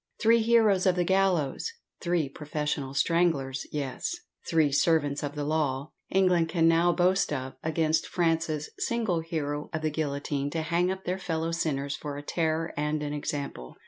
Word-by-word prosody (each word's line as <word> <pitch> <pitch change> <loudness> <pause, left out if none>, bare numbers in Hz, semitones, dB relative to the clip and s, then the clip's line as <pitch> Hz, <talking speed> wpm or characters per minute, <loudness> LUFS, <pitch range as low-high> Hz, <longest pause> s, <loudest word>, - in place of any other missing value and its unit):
Three 230 +1 +5
heroes 220 -5 +4
of 185 - +4
the 180 - +2
gallows 190 - +1 0.3
three 170 -4 +1
professional 145 -1 -3
stranglers 145 -5 +1
yes, 145 - -3 0.3
"three 160 -3 +3
servants 145 -1 +2
of 145 0 -4
the 145 - -2
law," 145 -2 -1 0.2
England 180 -3 +3
can 165 -2 +3
now 165 +1 +4
boast 180 +1 +2
of, 130 -2 -3
against 160 0 +1
France's 165 -3 0
single 225 -8 0
hero 150 -3 -3
of 160 0 -3
the 155 - +1
guillotine 145 -2 -2
to 160 +2 -2
hang 175 +2 +1
up 190 0 -3
their 185 +1 -1
fellow 165 -2 -2
sinners 140 -4 -1
for 145 -2 -6
a 145 - -7
terror 160 +1 -1
and 150 +1 -1
an 145 0 -3
example! 140 - -4
160 Hz, 165 wpm, -28 LUFS, 145-175 Hz, 0.3 s, Three